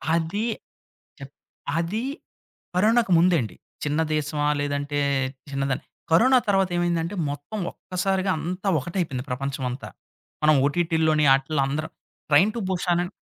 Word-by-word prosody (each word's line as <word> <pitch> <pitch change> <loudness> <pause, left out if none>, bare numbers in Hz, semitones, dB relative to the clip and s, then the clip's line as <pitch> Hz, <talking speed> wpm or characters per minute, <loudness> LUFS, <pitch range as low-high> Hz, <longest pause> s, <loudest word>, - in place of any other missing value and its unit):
అది 175 +7 -1 0.7
చె 140 - -8 0.5
అది 190 +8 -1 0.7
కరోనాకు 220 +1 +3
ముందే 175 0 +4
అండి. 105 -5 -7 0.3
చిన్న 150 +2 0
దేశమా 150 0 0
లేదంటే, 145 0 -2 0.5
చిన్నదాని 135 -1 -2 0.3
కరోనా 255 +10 +6
తర్వాత 195 -2 +3
ఏమైందంటే 170 +1 0 0.2
మొత్తం 145 +9 -6
ఒక్కసారిగా 190 +1 -1
అంతా 185 +4 -3
ఒకటైపోయింది. 150 -4 -3
ప్రపంచమంతా 130 0 -3 0.6
మనం 155 0 +6
ఓటీటీలోని 160 -1 +2
ఆటీల్లో 135 +1 0
అందరం 155 +3 -3 0.4
'ట్రైన్ 160 +9 +5
టూ - - -2
భూషానణ్' 175 0 0
165 Hz, 115 wpm, -24 LUFS, 145-185 Hz, 0.7 s, కరోనా